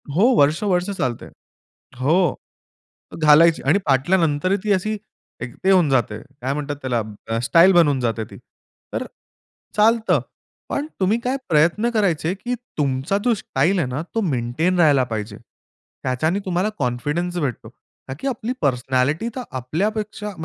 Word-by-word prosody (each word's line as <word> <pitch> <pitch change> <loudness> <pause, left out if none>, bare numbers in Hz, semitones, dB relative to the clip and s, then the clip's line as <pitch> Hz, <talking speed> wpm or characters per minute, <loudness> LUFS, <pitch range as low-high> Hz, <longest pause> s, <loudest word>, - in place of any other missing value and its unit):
हो, 185 - +3 0.2
वर्ष, 145 +3 +3
वर्ष 180 +2 +1
चालते, 120 -3 -2 0.8
हो, 140 +5 +2 1.1
घालायची 155 +2 +6
आणि 165 +8 +4
फाटल्यानंतर 160 +5 +2
ती 210 - 0
अशी 215 +3 -1 0.4
एक 120 0 -6
ते 190 - +4
होऊन 180 -6 +4
जाते. 120 -5 +1 0.2
काय 130 +2 -1
म्हणतात 145 0 -4
त्याला? 125 -3 -1 0.4
स्टाईल 170 +9 +5
बनवून 150 -6 +4
जाते 115 -2 -1
ती. - - -13 0.6
तर - - -2 0.7
चालतं, 225 +2 +3 0.5
पण 290 +2 -2
तुम्ही 200 +4 +2
काय 255 +3 -1
प्रयत्न 170 +9 +3
करायचे? 180 -6 +1
की 240 +5 -4 0.2
तुमचा 140 +6 0
जो 245 - +4
स्टाईल 180 -1 0
आहे 150 - 0
ना, 130 +4 -3
तो 225 - +1
मेंटेन 155 - 0
राहायला 145 -6 +5
पाहिजे. 105 -1 -5 0.7
त्याच्याने 155 +9 0
तुम्हाला 185 +2 0
कॉन्फिडन्स 150 +9 -2
भेटतो. 125 -7 -3 0.4
का 130 - -5
की 275 - -3
आपली 245 -2 -2
पर्सनॅलिटी 135 - 0
तर 260 - -3 0.2
आपल्यापेक्षा 210 - -3
160 Hz, 140 wpm, -21 LUFS, 130-195 Hz, 1.1 s, घालायची